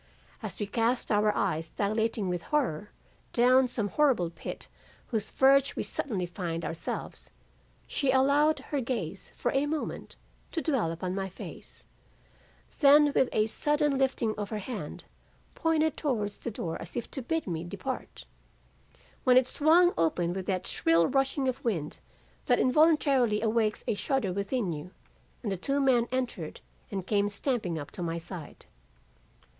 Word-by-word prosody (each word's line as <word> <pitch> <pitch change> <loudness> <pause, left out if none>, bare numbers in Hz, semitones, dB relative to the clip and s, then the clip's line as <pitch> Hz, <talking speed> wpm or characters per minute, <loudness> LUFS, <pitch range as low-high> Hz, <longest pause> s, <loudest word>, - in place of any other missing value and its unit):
As - - -6
we 205 - -1
cast 235 +4 0
our 210 0 +4
eyes 160 +1 -1
dilating 215 0 -1
with 175 -1 -2
horror, 225 - 0 0.4
down 255 +2 +5
some 230 -4 -2
horrible 255 - +2
pit 165 - -7
upon - - -29
whose 220 -3 -1
verge 275 +1 +4
we - - -2
suddenly 200 -10 -2
find 170 -2 -4
ourselves, 165 - -5 0.6
she 275 - -1
allowed 280 +4 +4
her 285 -2 +1
gaze 210 -8 -4
for - - -1
a 275 +2 +1
moment 310 0 -4 0.4
to 330 - 0
dwell 265 - +1
upon 180 +2 -3
my 190 0 -3
face, 185 - -11 0.9
then 290 0 +6
with 260 - +3
a 215 - +2
sudden 295 +5 +1
lifting 265 -4 +1
of 205 -1 -3
her 215 - -3
hand, 225 +5 -6 0.5
pointed 315 -2 +1
towards 215 -9 -2
the - - -4
door 170 -6 -4
as 170 - -9
if 240 - -4
to 270 - -3
bid 325 +6 -1
me 165 -3 -3
depart 200 +9 -6 1.0
when 250 -1 +6
it 255 -1 +5
swung 335 +6 +4
open 170 +1 +1
with 190 0 -5
that 185 -1 -1
shrill 165 0 +3
rushing 270 - +1
of 260 +2 -2
wind 170 - -2 0.5
that - - +4
involuntarily 270 -5 +4
awakes 220 -1 +1
a - - +2
shudder 210 -3 -1
within 200 -1 -1
you, 150 +3 -7 0.5
and 210 - -2
the 195 - -1
two 275 +10 0
men 250 -4 +3
entered 245 -11 -3 0.3
and 195 -3 -4
came 205 0 +1
stamping 205 - -1
up 145 -2 -7
to - - -7
my 170 -1 -2
side. 170 -2 -8
225 Hz, 160 wpm, -29 LUFS, 185-270 Hz, 1.0 s, then